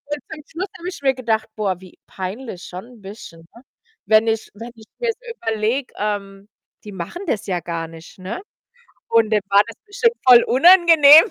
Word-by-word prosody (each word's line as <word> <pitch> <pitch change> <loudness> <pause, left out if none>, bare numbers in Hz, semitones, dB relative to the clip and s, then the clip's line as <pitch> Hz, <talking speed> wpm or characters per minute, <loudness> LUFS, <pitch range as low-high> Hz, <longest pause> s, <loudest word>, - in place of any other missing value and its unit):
zum 295 +1 -8
Schluss 360 +4 -5
habe 350 +1 -6
ich 365 - -7
mir 270 -1 +2
gedacht: 225 -4 -1
„Boah, 195 -4 -2
wie 185 -2 -16
peinlich 190 +1 -7
schon 180 +1 -8
'n 245 -4 -17
bisschen“, 190 -5 -12
ne? 235 - -16 0.4
Wenn 220 +1 +4
ich 225 -1 -1
wenn 230 +3 -9
ich 220 -2 -17
mir's 470 -2 -1 0.2
überlege, 225 - -2
ähm, 200 -1 -4 0.4
die 210 - -9
machen 190 - -7
das 220 - -2
ja 180 -3 -2
gar 165 -1 -5
nicht, 165 +2 -14
ne, 190 +5 -6 0.7
und 225 -1 +3
dem 210 -1 +2
war 200 +1 +6
das 230 - -10
bestimmt 465 +3 +1
voll 245 -2 +8
unangenehm. 325 0 +7
225 Hz, 180 wpm, -20 LUFS, 195-285 Hz, 0.7 s, voll